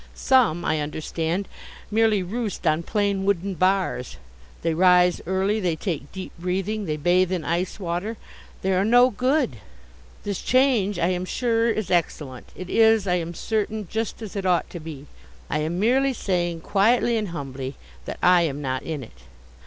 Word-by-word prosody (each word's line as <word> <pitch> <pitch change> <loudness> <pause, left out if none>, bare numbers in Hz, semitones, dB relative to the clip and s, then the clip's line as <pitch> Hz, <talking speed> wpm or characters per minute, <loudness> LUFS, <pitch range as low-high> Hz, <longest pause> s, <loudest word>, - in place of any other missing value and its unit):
Some, 240 -11 +3
I 155 - +1
understand, 160 +5 -2 0.4
merely 215 -2 +3
roost 210 +1 -4
on 155 0 +2
plain 200 +1 0
wooden 195 0 0
bars. 185 - 0 0.5
They 165 -1 +1
rise 180 +1 +4
early. 190 +3 +1
They 180 -5 0
take 155 -4 -4
deep 190 -1 -7
breathing. 195 +4 -2
They 155 -3 -2
bathe 180 +4 +2
in 175 -5 -2
ice 175 +5 -1
water. 185 +5 -3 0.5
They 190 0 +1
are 185 +1 +2
no 245 +4 +5
good. 255 - +1 0.7
This 200 -2 -3
change 245 -7 +2
I 175 0 +1
am 180 0 -1
sure, 230 +2 +1
is 215 -4 -2
excellent. 150 -7 -1
It 185 - -7
is, 225 0 +4
I 180 -2 +2
am 170 0 -4
certain, 215 0 -2
just 225 0 -3
as 215 - -8
it 200 - -2
ought 180 -1 +1
to 175 - -6
be. 155 -3 -8 0.5
I - - +1
am 160 +3 -2
merely 265 +6 +3
saying, 175 -6 -1
quietly 230 +6 +2
and 215 -2 -1
humbly, 135 -5 -6 0.3
that - - -5
I 180 -1 +6
am 145 -4 -1
not 130 -2 -2
in 155 -4 -5
it. 65 - -15
185 Hz, 170 wpm, -24 LUFS, 165-215 Hz, 0.7 s, I